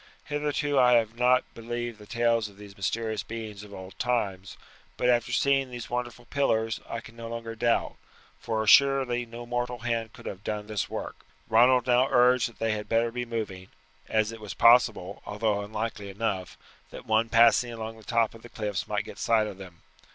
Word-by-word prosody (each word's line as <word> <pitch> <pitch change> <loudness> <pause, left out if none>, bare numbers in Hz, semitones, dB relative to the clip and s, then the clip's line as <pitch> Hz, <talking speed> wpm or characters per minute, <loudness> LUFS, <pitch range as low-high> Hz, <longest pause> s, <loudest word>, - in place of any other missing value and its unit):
Hitherto 145 -1 0
I 125 -1 +6
have 115 -1 +2
not 125 +1 +4
believed 120 0 -5
the 105 - -13
tales 115 -1 +1
of 100 - -19
these 100 -1 -12
mysterious 110 +2 -2
beings 110 -1 -7
of 105 - -12
old 95 -1 -10
times; 100 -6 -1 0.4
but 125 - +1
after 120 -1 +2
seeing 135 -1 +2
these 120 -1 -8
wonderful 120 -1 -4
pillars 115 -5 0
I 115 - -4
can 115 0 -14
no 115 -1 -7
longer 115 -1 -5
doubt, 115 +1 0 0.4
for 110 -1 -2
assuredly 125 0 +4
no 120 +1 -8
mortal 120 0 -2
hand 115 -2 -2
could - - -14
have 95 +1 -7
done 105 -1 -3
this 105 -1 -3
work." - - -5 0.3
Ronald 125 +2 +5
now 125 +1 +4
urged 125 -1 +4
that 115 - -19
they 115 0 0
had 105 -1 -4
better 115 +1 +2
be 125 +1 -3
moving, 105 -5 -4 0.4
as 110 0 +1
it 115 -1 -10
was 105 - -7
possible, 115 -5 +4
although 105 0 -1
unlikely 105 -1 -4
enough, 95 -3 -3 0.3
that - - -10
one 110 +1 +2
passing 120 +1 +5
along 115 -1 -6
the 110 - -15
top 115 0 +1
of 115 - -13
the 120 - -12
cliffs 105 -4 -3
might - - -1
get - - -10
sight 110 -2 +3
of 100 -2 -7
them. 90 -3 -12
115 Hz, 195 wpm, -27 LUFS, 105-120 Hz, 0.4 s, I